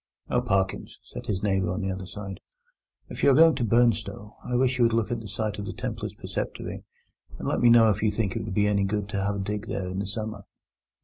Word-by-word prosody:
"Oh, - - +3
Parkins," 95 -1 -1
said - - -9
his 100 -1 -2
neighbour 95 -3 +1
on 95 - -2
the 95 0 -1
other 95 0 -5
side, 100 0 -7 0.7
"if - - -7
you - - +6
are 135 - +6
going 165 +2 +7
to 130 -2 -2
Burnstow, 110 -2 +1
I 125 - -3
wish 125 0 +2
you - - +5
would 115 - +2
look 115 +1 +1
at 120 - -1
the 110 - -8
site 105 +1 -3
of 100 - -4
the - - -4
Templars' - - -5
preceptory, - - -5 0.5
and - - -5
let - - +1
me 120 - +6
know 115 -2 +7
if 100 - -2
you 110 - +3
think 105 +1 -1
it 115 - -2
would 105 -3 -5
be 105 - +3
any 100 -1 +2
good 105 +1 -1
to 100 -2 -2
have 100 +1 0
a - - -3
dig 105 +2 -3
there 95 -5 -3
in 95 +1 -4
the 100 - -2
summer." 110 -1 -5
105 Hz, 255 wpm, -26 LUFS, 100-115 Hz, 0.7 s, going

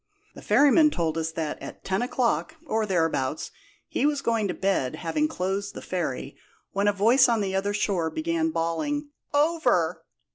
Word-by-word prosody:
The - - -12
ferryman 295 +2 +5
told 165 - -1
us 160 0 -1
that 160 -2 -4
at - - -9
ten 190 +2 0
o'clock, 250 +5 0
or 220 -6 0
thereabouts, 160 -6 0 0.4
he - - -2
was 290 -2 -1
going 225 -3 +1
to 180 - -2
bed 190 -10 0
having 240 - 0
closed 195 -6 -3
the - - -6
ferry, - - -3 0.4
when 200 +1 0
a - - +5
voice 230 +6 +4
on 230 -1 +2
the 195 -2 -1
other 195 +1 0
shore 195 -6 0
began 325 - -1
bawling 290 - -2 0.2
'Over!' 315 +3 +2
205 Hz, 170 wpm, -26 LUFS, 180-290 Hz, 0.4 s, ferryman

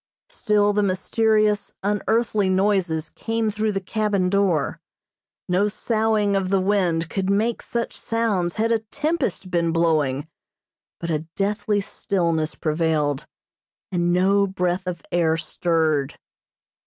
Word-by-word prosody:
Still 210 - +2
the 210 - +2
mysterious, 210 +2 +1
unearthly 210 0 +1
noises 185 -5 +1
came 225 +3 -2
through 215 +1 -1
the 195 - -1
cabin 200 -1 0
door. 195 -7 +1 0.7
No 185 +3 +2
soughing 215 -1 +1
of 190 -1 0
the 195 0 +3
wind 185 -4 +1
could 190 +2 -2
make 215 +4 +1
such 235 0 -3
sounds 210 -7 0
had 225 +1 +1
a 230 - +3
tempest 275 - -2
been 170 -1 +1
blowing, 155 -4 +1 0.7
but 170 0 -3
a 155 0 -2
deathly 205 +1 0
stillness 170 -6 -1
prevailed, 155 -2 0 0.6
and 175 -1 +1
no 195 +3 +3
breath 180 -1 -1
of 175 -2 -4
air 165 -2 +2
stirred. 160 -3 0
195 Hz, 125 wpm, -23 LUFS, 170-210 Hz, 0.7 s, the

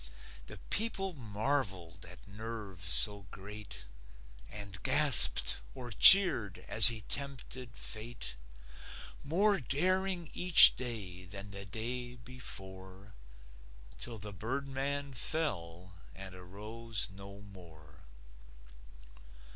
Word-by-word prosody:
The - - -11
people 195 -4 -2
marvelled 105 - -5
at - - -13
nerve 105 -3 -10
so 90 +9 +3
great 100 - -11 0.6
And 100 -3 -7
gasped 140 -2 +3 0.2
or 125 -2 -9
cheered 140 - +7
as - - +7
he 115 -2 +1
tempted 130 -2 -5
fate, 110 - -7 0.9
More 195 +7 0
daring 180 +5 -3
each 180 -2 +7
day 100 -8 -6
than 100 +2 -11
the 100 0 -8
day 120 +5 -6
before, 95 -5 -11 0.9
Till 120 -2 -6
the 105 0 -10
birdman 140 +5 -5
fell 95 - -5 0.2
and 95 -1 -10
arose 105 +5 -6
no 100 +1 -13
more. 80 -6 -17
110 Hz, 95 wpm, -30 LUFS, 95-135 Hz, 0.9 s, cheered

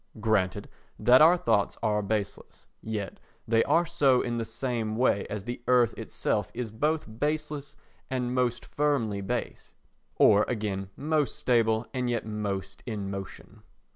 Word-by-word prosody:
Granted 100 -3 0 0.3
that 125 +3 +6
our 170 +3 +7
thoughts 110 - +1
are 105 -1 +2
baseless, 105 0 -4 0.2
yet 105 -4 -5 0.3
they 115 0 +3
are 170 +1 +3
so 140 -6 +3
in 120 -1 -2
the 115 - -2
same 115 -2 -3
way 115 -4 +2
as 105 -2 -4
the 120 +2 -5
earth 125 -2 +4
itself - - -2
is 120 -3 -4
both 150 +8 0
baseless 150 -1 -2 0.3
and 125 -2 -1
most 125 -2 0
firmly 120 -9 0
based, 95 - -4 0.4
or 105 +1 +6
again 100 -5 -3
most 150 0 0
stable 115 -2 +2
and 125 -2 -1
yet 120 -2 -1
most 100 -3 -4
in 100 -4 -4
motion. 95 -1 -8
115 Hz, 145 wpm, -28 LUFS, 105-130 Hz, 0.4 s, our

